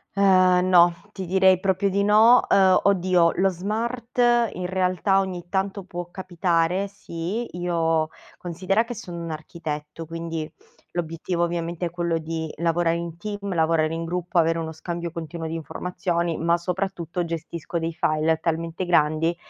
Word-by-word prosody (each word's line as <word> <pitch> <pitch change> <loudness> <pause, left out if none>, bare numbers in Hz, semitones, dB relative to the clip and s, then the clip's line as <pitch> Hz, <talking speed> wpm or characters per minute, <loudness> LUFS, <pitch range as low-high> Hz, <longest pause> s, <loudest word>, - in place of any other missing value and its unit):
Ehm, 185 -2 +4
no, 175 -1 +6 0.2
ti 190 -3 -6
direi 190 0 +4
proprio 195 +1 +1
di 200 +1 +1
no. 220 +4 +6
Uhm, 190 -2 +5
oddio, 180 -3 +3
lo 195 +1 +3
smart 230 +7 -4 0.3
in 180 -1 -4
realtà 185 +1 +1
ogni 180 -3 -4
tanto 195 0 -1
può 175 -1 -6
capitare, 180 0 0
sì, 195 +3 -5
io 165 -2 +1 0.3
considera 185 +5 0
che 240 +1 -6
sono 175 -6 -8
un 165 - -5
architetto, 155 0 -6
quindi 165 -1 -5 0.4
l'obiettivo 170 +1 -2
ovviamente 170 0 -2
è - - -6
quello 170 -1 -1
di 160 0 -4
lavorare 170 +1 +1
in 170 -1 -6
team, 200 -1 -5
lavorare 160 -1 +2
in 165 - -3
gruppo, 175 +1 -3
avere 165 0 +3
uno 160 -1 -4
scambio 170 +1 -5
continuo 165 0 -6
di 160 - -4
informazioni, 170 +1 -2
ma 170 +1 +2
soprattutto 180 -1 -3
gestisco 170 0 -4
dei 165 0 -3
file 155 0 +1
talmente 165 +2 -2
grandi 165 0 +2
175 Hz, 150 wpm, -24 LUFS, 165-190 Hz, 0.4 s, no